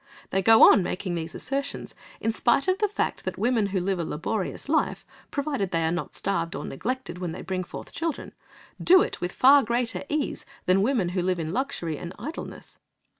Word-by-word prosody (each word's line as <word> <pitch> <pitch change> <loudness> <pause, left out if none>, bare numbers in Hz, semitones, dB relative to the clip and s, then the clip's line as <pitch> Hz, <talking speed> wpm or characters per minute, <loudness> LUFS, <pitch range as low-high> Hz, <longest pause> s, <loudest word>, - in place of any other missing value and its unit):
They 195 - +2
go 225 +3 +7
on 205 - +8
making 180 +1 -3
these 165 -1 -4
assertions, 275 +1 -4 0.3
in 225 - 0
spite 240 +7 +2
of 370 +1 +2
the 420 - +3
fact 420 - -2
that - - -4
women 235 -3 +2
who 195 -1 -1
live 185 0 -1
a - - 0
laborious 180 - -3
life, 310 +2 0 0.2
provided 280 - -2
they 165 -2 0
are 160 - +1
not 175 - -4
starved 170 -4 -1
or - - -5
neglected 245 - -4
when 175 -3 -3
they - - -7
bring 185 -1 -2
forth - - -9
children, 330 -2 -3 0.5
do 370 +2 +7
it - - -5
with 175 - -2
far 275 +6 +6
greater 235 0 -1
ease 300 -1 -2 0.2
than 185 +1 +4
women 220 -5 +1
who 180 0 -1
live 180 0 0
in 160 0 -3
luxury 220 - -2
and 175 +1 -7
idleness. 315 +3 -8
200 Hz, 200 wpm, -26 LUFS, 180-275 Hz, 0.5 s, on